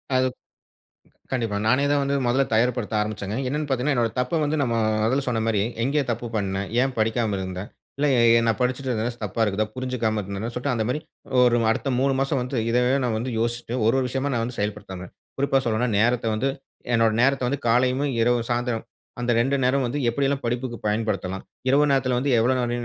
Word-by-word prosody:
அது 130 Hz, 0 st, +3 dB, 1.1 s
கண்டிப்பா. 115 Hz, -5 st, -1 dB
நானே 130 Hz, +5 st, +3 dB
தான் 145 Hz, 0 st, +3 dB
வந்து 140 Hz, 0 st, 0 dB
முதல 130 Hz, +3 st, +3 dB
தயார் 120 Hz, +3 st, +3 dB
படுத்த 110 Hz, -3 st, -4 dB
ஆரம்பிச்சேங்க. 105 Hz, 0 st, -3 dB
என்னன்னு 150 Hz, +2 st, -2 dB
பாத்தீங்கன்னா, 135 Hz, +2 st, +1 dB
என்னுடைய 115 Hz, -3 st, +1 dB
தப்ப 125 Hz, +6 st, 0 dB
வந்து 150 Hz, +2 st, 0 dB
நம்மோ 115 Hz, -3 st, 0 dB, 0.3 s
முதல்ல 130 Hz, +5 st, +1 dB
சொன்ன 115 Hz, -2 st, 0 dB
மாரி 105 Hz, -3 st, +1 dB, 0.2 s
எங்கே 145 Hz, +4 st, +1 dB
தப்பு 120 Hz, +1 st, -3 dB
பண்னேன்? 100 Hz, -1 st, -2 dB
ஏன் 135 Hz, -1 st, -1 dB
படிக்காம 110 Hz, -2 st, +1 dB
இருந்தேன்? 95 Hz, +1 st, -5 dB, 0.3 s
இல்ல 150 Hz, -, +2 dB
ஏ 120 Hz, -, +4 dB, 0.3 s
நான் 115 Hz, -, +1 dB
படிச்சிட்டுருந்தது 125 Hz, -2 st, -1 dB
ச -, -, -22 dB
தப்பா 105 Hz, +3 st, -4 dB
இருக்குதா? 105 Hz, +1 st, 0 dB
புரிஞ்சிக்காம 120 Hz, -4 st, -1 dB
இருந்தேனா? 100 Hz, +4 st, -4 dB
சொல்லிட்டு, 125 Hz, +2 st, -1 dB
அந்த 110 Hz, -2 st, 0 dB
மாதிரி 130 Hz, +5 st, -1 dB, 0.4 s
ஒரு 120 Hz, -1 st, +4 dB
அடுத்த 125 Hz, -, -1 dB
3 135 Hz, 0 st, +2 dB
மாசம் 135 Hz, -1 st, 0 dB
வந்து 125 Hz, +2 st, -4 dB
இதையே 125 Hz, +3 st, +3 dB
நான் 115 Hz, -3 st, 0 dB
வந்து 125 Hz, +3 st, -3 dB
யோசிட்டு 120 Hz, +1 st, -2 dB
ஒரு 115 Hz, -, +4 dB
ஒரு 130 Hz, -, +1 dB
விஷயமா 135 Hz, +2 st, -2 dB
நான் 115 Hz, -, 0 dB
வந்து 120 Hz, 0 st, -5 dB
செயல்படுத்துறேன். 100 Hz, -3 st, -5 dB, 0.3 s
குறிப்பா 135 Hz, 0 st, +2 dB
சொல்லணும்னா, 120 Hz, +1 st, 0 dB
நேரத்த 120 Hz, +1 st, +2 dB
வந்து 130 Hz, +5 st, 0 dB, 0.5 s
என்னுடைய 115 Hz, -1 st, +3 dB
நேரத்த 135 Hz, 0 st, +2 dB
வந்து 140 Hz, +1 st, -2 dB
காலையிவும், 130 Hz, +4 st, +2 dB
இரவு, 120 Hz, +1 st, +3 dB
சாயந்திரம் 120 Hz, -1 st, -1 dB, 0.4 s
அந்த 120 Hz, -, -1 dB
2 135 Hz, +4 st, +2 dB
நேரமும் 130 Hz, 0 st, +2 dB
வந்து 135 Hz, +5 st, -2 dB
எப்படியெல்லாம் 140 Hz, +3 st, 0 dB
படிப்புக்கு 120 Hz, +1 st, -2 dB
பயன்படுத்தலாம்? 105 Hz, -3 st, -1 dB, 0.3 s
இரவு 145 Hz, +3 st, +4 dB
நேரத்துல 130 Hz, -2 st, +2 dB
வந்து 140 Hz, +3 st, 0 dB
எவ்வளோ 120 Hz, +3 st, +3 dB
நேரம் 120 Hz, -1 st, -1 dB
120 Hz, 190 wpm, -24 LUFS, 110-130 Hz, 1.1 s, ஏ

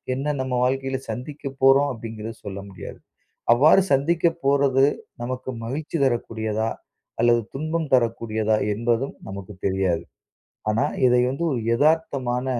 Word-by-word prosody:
என்ன 150 Hz, +3 st, -1 dB
நம்ம 130 Hz, -1 st, -3 dB
வாழ்க்கைல 135 Hz, +1 st, -1 dB
சந்திக்க 140 Hz, +6 st, -7 dB, 0.2 s
போறோம்? 135 Hz, +2 st, +5 dB
அப்டிங்கிறத 110 Hz, -1 st, -7 dB
சொல்ல 100 Hz, 0 st, -5 dB
முடியாது. 95 Hz, -, -9 dB, 0.5 s
அவ்வாறு 155 Hz, +10 st, +6 dB
சந்திக்க 165 Hz, +5 st, +2 dB, 0.2 s
போறது 140 Hz, -1 st, +3 dB, 0.4 s
நமக்கு 130 Hz, +1 st, -4 dB, 0.2 s
மகிழ்ச்சி 150 Hz, +7 st, -4 dB
தரக்கூடியதா? 110 Hz, -3 st, -1 dB, 0.5 s
அல்லது 120 Hz, 0 st, +4 dB
துன்பம் 155 Hz, +2 st, -2 dB
தரக்கூடியதா? 115 Hz, -3 st, +1 dB, 0.2 s
என்பதும் 120 Hz, +4 st, 0 dB, 0.2 s
நமக்கு 100 Hz, +1 st, -7 dB
தெரியாது. 95 Hz, -3 st, +1 dB, 0.7 s
ஆனா, 115 Hz, +6 st, +1 dB, 0.2 s
இதை 125 Hz, 0 st, +4 dB
வந்து 140 Hz, +6 st, -3 dB
ஒரு 125 Hz, -, -1 dB
எதார்த்தமான 135 Hz, -3 st, +1 dB
125 Hz, 120 wpm, -23 LUFS, 110-140 Hz, 0.7 s, அவ்வாறு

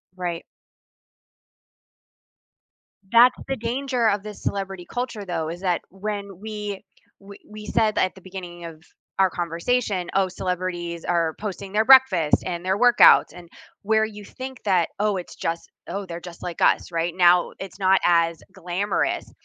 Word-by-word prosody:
Right. 175 Hz, -2 st, -4 dB, 2.7 s
That's 240 Hz, +2 st, +7 dB
the 270 Hz, -, -1 dB
danger 245 Hz, 0 st, 0 dB
of 200 Hz, -1 st, -1 dB
this 210 Hz, -1 st, -9 dB
celebrity 195 Hz, -2 st, -4 dB
culture 245 Hz, -4 st, -4 dB
though, 165 Hz, -4 st, -3 dB
is 175 Hz, +2 st, -7 dB
that 180 Hz, -3 st, 0 dB
when 200 Hz, -1 st, -6 dB
we 210 Hz, -2 st, -6 dB, 0.4 s
we 200 Hz, 0 st, -13 dB
we 210 Hz, 0 st, -10 dB
said 215 Hz, 0 st, +1 dB
that -, -, +3 dB
at 185 Hz, -, -7 dB
the 190 Hz, -, -14 dB
beginning 180 Hz, -2 st, -9 dB
of 160 Hz, -1 st, -10 dB, 0.4 s
our 190 Hz, -1 st, +5 dB
conversation, 180 Hz, +3 st, -1 dB
"Oh, 195 Hz, -1 st, +2 dB
celebrities 180 Hz, -2 st, -4 dB
are 165 Hz, -2 st, 0 dB
posting 200 Hz, -2 st, -6 dB
their 215 Hz, +2 st, +2 dB
breakfast 230 Hz, -, +6 dB
and 175 Hz, -1 st, -4 dB
their 190 Hz, +1 st, +1 dB
workouts," 245 Hz, +2 st, +6 dB
and 175 Hz, -1 st, -12 dB, 0.4 s
where 220 Hz, +1 st, +3 dB
you 210 Hz, -1 st, -9 dB
think 260 Hz, +3 st, -8 dB
that, 185 Hz, -4 st, +2 dB
"Oh, 210 Hz, -1 st, +1 dB
it's 180 Hz, -, -8 dB
just 165 Hz, 0 st, -4 dB, 0.2 s
oh, 200 Hz, 0 st, -4 dB
they're 170 Hz, -2 st, -7 dB
just 175 Hz, -1 st, -11 dB
like 175 Hz, -2 st, -6 dB
us." -, -, +3 dB
Right? 170 Hz, 0 st, -1 dB
Now 175 Hz, -1 st, +4 dB
it's 190 Hz, 0 st, -8 dB
not 190 Hz, 0 st, +4 dB
as 170 Hz, -1 st, +2 dB
glamorous, 185 Hz, +2 st, -2 dB
190 Hz, 155 wpm, -23 LUFS, 175-210 Hz, 2.7 s, That's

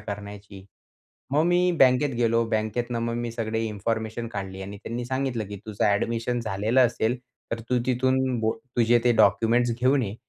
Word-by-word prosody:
करण्याची. 100 Hz, -1 st, -8 dB, 0.7 s
मग 150 Hz, +2 st, +3 dB
मी 180 Hz, +1 st, +3 dB
बँकेत 130 Hz, +1 st, +4 dB
गेलो 115 Hz, -1 st, +2 dB
बँकेतनं 115 Hz, +2 st, -1 dB
मग 115 Hz, 0 st, -2 dB
मी 120 Hz, 0 st, -3 dB
सगळी 115 Hz, -1 st, -2 dB
इन्फॉर्मेशन 110 Hz, +2 st, -3 dB
काढली 95 Hz, -3 st, -6 dB
आणि 100 Hz, +2 st, -7 dB
त्यांनी 115 Hz, +4 st, -5 dB
सांगितलं 130 Hz, -4 st, -2 dB
की 105 Hz, -, -6 dB
"तुझं 105 Hz, -2 st, -2 dB
ऍडमिशन 115 Hz, +4 st, 0 dB
झालेलं 110 Hz, +3 st, +1 dB
असेल 115 Hz, +1 st, -1 dB, 0.3 s
तर 115 Hz, -, -3 dB
तू 125 Hz, -, +2 dB
तिथून 130 Hz, 0 st, +1 dB
बो 110 Hz, 0 st, +1 dB, 0.2 s
तुझे 120 Hz, 0 st, +4 dB
ते 120 Hz, -, +5 dB
डॉक्युमेंट्स 115 Hz, +4 st, +3 dB
घेऊन 130 Hz, +2 st, +3 dB
ये 100 Hz, -3 st, -4 dB
115 Hz, 165 wpm, -25 LUFS, 105-125 Hz, 0.7 s, ते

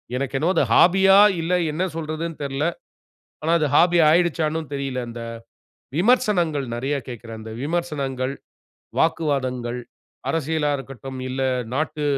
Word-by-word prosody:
எனக்கு 135 Hz, +1 st, -2 dB
என்னமோ 170 Hz, +6 st, +1 dB
அது -, -, +4 dB
ஹாபி 190 Hz, +2 st, +5 dB, 0.2 s
ஆ -, -, +8 dB, 0.2 s
இல்ல 165 Hz, +2 st, -2 dB, 0.2 s
என்ன 160 Hz, +5 st, -1 dB
சொல்றதுன்னு 160 Hz, +1 st, -4 dB
தெரில. 140 Hz, +1 st, -2 dB, 0.8 s
ஆனா 165 Hz, -, +1 dB
அது 150 Hz, -, +2 dB
ஹாபியா 175 Hz, -1 st, +5 dB
ஆயிடுச்சான்னு 160 Hz, -2 st, +2 dB
தெரியல. 135 Hz, -2 st, -3 dB, 1.0 s
விமர்சனங்கள் 180 Hz, -, +2 dB
நிறைய 135 Hz, +4 st, -1 dB
கேட்கிறேன். 115 Hz, -2 st, -8 dB
அந்த 110 Hz, 0 st, -8 dB
விமர்சனங்கள், 140 Hz, -5 st, -2 dB, 0.7 s
வாக்குவாதங்கள், 130 Hz, -7 st, 0 dB, 0.5 s
அரசியலாக 155 Hz, -2 st, 0 dB
இருக்கட்டும், 135 Hz, 0 st, -8 dB
இல்ல 130 Hz, +1 st, -3 dB, 0.3 s
நாட்டு 150 Hz, +1 st, -2 dB
150 Hz, 120 wpm, -23 LUFS, 135-165 Hz, 1.0 s, ஆ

